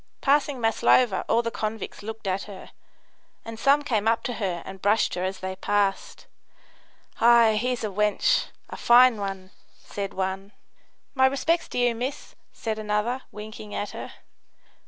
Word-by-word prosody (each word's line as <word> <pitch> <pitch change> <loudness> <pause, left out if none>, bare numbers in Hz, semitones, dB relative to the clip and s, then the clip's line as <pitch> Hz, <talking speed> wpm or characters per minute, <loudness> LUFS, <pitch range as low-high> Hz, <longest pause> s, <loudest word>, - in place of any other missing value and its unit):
Passing 285 -1 +1
Maslova, 225 -1 +3
all 235 - +3
the 230 - -2
convicts 215 -2 -5
looked 220 +1 -8
at 190 +1 -2
her, 200 -3 -11 0.7
and 225 -1 -8
some 280 +4 +3
came 220 -6 0
up 225 0 +2
to 245 - -3
her 180 -4 -2
and 190 -1 -9
brushed 210 +2 +2
her 180 - -3
as 190 +1 -4
they 190 0 -4
passed. 200 0 -1 0.9
"Ay, 235 -2 +6
here's 250 -1 -2
a 215 - -1
wench 210 - +2 0.3
a - - -6
fine 245 0 +6
one," 195 -2 -5 0.3
said 200 -1 -6
one. 190 +1 -3 0.6
"My 265 -1 +4
respects 320 +5 0
to - - -7
you, 245 -1 +2
miss," 250 +5 -5 0.2
said 220 -1 -4
another, 215 +4 -1
winking 210 0 -9
at 205 - -3
her. - - -8
220 Hz, 155 wpm, -25 LUFS, 200-245 Hz, 0.9 s, Ay